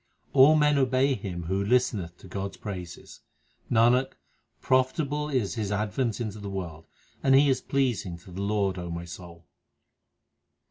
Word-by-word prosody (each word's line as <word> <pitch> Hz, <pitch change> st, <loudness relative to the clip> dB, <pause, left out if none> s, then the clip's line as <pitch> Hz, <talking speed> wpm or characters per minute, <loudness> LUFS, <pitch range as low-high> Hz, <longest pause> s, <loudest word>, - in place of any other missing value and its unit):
All 145 Hz, +3 st, +7 dB
men 150 Hz, -1 st, +3 dB
obey 130 Hz, +1 st, +2 dB
him 95 Hz, -6 st, -5 dB
Who 95 Hz, +4 st, -1 dB
listeneth 100 Hz, -6 st, 0 dB
to -, -, -14 dB
God 95 Hz, +1 st, -5 dB
s -, -, -21 dB
praises. 90 Hz, -5 st, -8 dB, 0.5 s
Nanak, 120 Hz, +3 st, +3 dB, 0.5 s
profitable 145 Hz, +3 st, 0 dB
is 125 Hz, -8 st, 0 dB
his 105 Hz, -4 st, -3 dB
advent 105 Hz, +3 st, -1 dB
into 110 Hz, -3 st, -4 dB
the 100 Hz, -1 st, -6 dB
world, 85 Hz, -5 st, -6 dB, 0.3 s
And 135 Hz, 0 st, +4 dB
he 140 Hz, +1 st, +5 dB
is 130 Hz, -, +1 dB
pleasing 120 Hz, -10 st, -1 dB
to 90 Hz, +1 st, -15 dB
the 95 Hz, +3 st, -6 dB
Lord, 100 Hz, -2 st, 0 dB
O 85 Hz, -1 st, -5 dB
my 85 Hz, 0 st, -5 dB
soul. 85 Hz, -1 st, -11 dB
105 Hz, 155 wpm, -27 LUFS, 90-130 Hz, 0.5 s, All